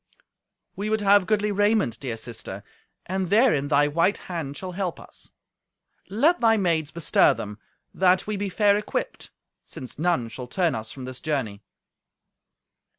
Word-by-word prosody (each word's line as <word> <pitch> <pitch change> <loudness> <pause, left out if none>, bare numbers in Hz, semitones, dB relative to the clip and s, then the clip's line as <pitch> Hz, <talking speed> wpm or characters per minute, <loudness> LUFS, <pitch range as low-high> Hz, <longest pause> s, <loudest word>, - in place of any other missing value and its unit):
"We 205 +2 -3
would 220 0 +1
have 200 -1 +5
goodly 210 -1 +1
raiment, 205 - +1
dear 120 -5 -4
sister, 110 -4 -7 0.4
and 190 -1 -2
therein 205 - +3
thy 145 0 +3
white 170 +6 +2
hand 155 -6 -6
shall 185 -1 -5
help 180 -1 -3
us. - - -12 0.8
Let 295 - +2
thy 225 -1 +4
maids 165 -6 +1
bestir 165 -3 +3
them, 105 +1 -7 0.3
that 185 0 +3
we 215 - -2
be 200 0 -2
fair 205 +1 +3
equipped, 210 +1 -4 0.3
since 130 +1 -9
none 165 -8 +1
shall 125 +2 -7
turn 175 +5 0
us 110 0 -5
from 130 -2 -8
this 130 0 -7
journey." 130 -10 -2
175 Hz, 150 wpm, -25 LUFS, 135-205 Hz, 0.8 s, have